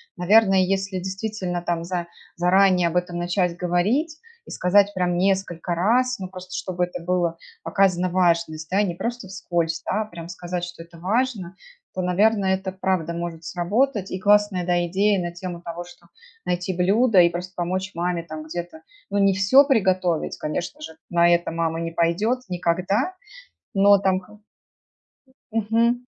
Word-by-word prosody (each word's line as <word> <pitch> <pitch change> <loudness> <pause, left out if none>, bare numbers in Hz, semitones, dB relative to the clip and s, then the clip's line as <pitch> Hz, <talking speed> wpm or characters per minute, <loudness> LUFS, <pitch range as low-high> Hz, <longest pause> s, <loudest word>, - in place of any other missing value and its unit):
Наверное, 195 +2 +4
если 190 0 0
действительно 190 -1 -4
там 170 -1 -1
за 175 0 -3 0.3
заранее 180 0 +4
об 175 - -1
этом 175 -1 -2
начать 175 0 0
говорить 210 - 0 0.3
и - - -12
сказать 200 +2 +3
прям 180 -1 0
несколько 185 -2 0
раз, 245 +7 +2
ну, 185 -1 -6
просто 185 -1 -10
чтобы 180 -1 -1
это 175 -1 -8
было 175 -2 0 0.3
показано 185 -2 +2
важность, 170 -3 +1
да, 195 +3 +2
не 175 -4 -2
просто 235 0 -4
вскользь, 170 -3 -2
да, 215 - 0
а - - -10
прям 170 -4 -10
сказать, 175 0 -5
что 175 -1 -7
это 170 0 -17
важно, 200 -2 -1 0.4
то, 185 - -3
наверное, 195 +2 +2
это 190 0 -5
правда 185 -3 -1
может 170 -1 -5
сработать. 195 +6 0
И 185 - -3
классная, 205 -3 +3
да, 175 -1 +1
идея 200 +2 +2
на 175 0 -3
тему 175 -1 -7
того, 170 0 -6
что 175 - -17 0.4
найти 180 +1 -1
блюдо 200 +4 +3
и 170 -1 +6
просто 180 +2 -6
помочь 185 +2 -2
маме 170 0 -2
там 155 -1 -8
где-то, 170 0 -7 0.3
ну, 200 - -1
не 195 -1 +4
всё 230 +9 +5
приготовить, 185 - +1
конечно 170 - -4
же, 160 - -9
на 170 0 +4
это 170 -1 +2
мама 165 0 -1
не 165 0 -3
пойдёт 170 +10 +1
никогда, 185 - 0 0.6
но 200 0 +6
там 190 -1 +1
ха 210 +3 -17 1.1
Мгм. 230 +3 +1
180 Hz, 165 wpm, -23 LUFS, 175-200 Hz, 1.1 s, и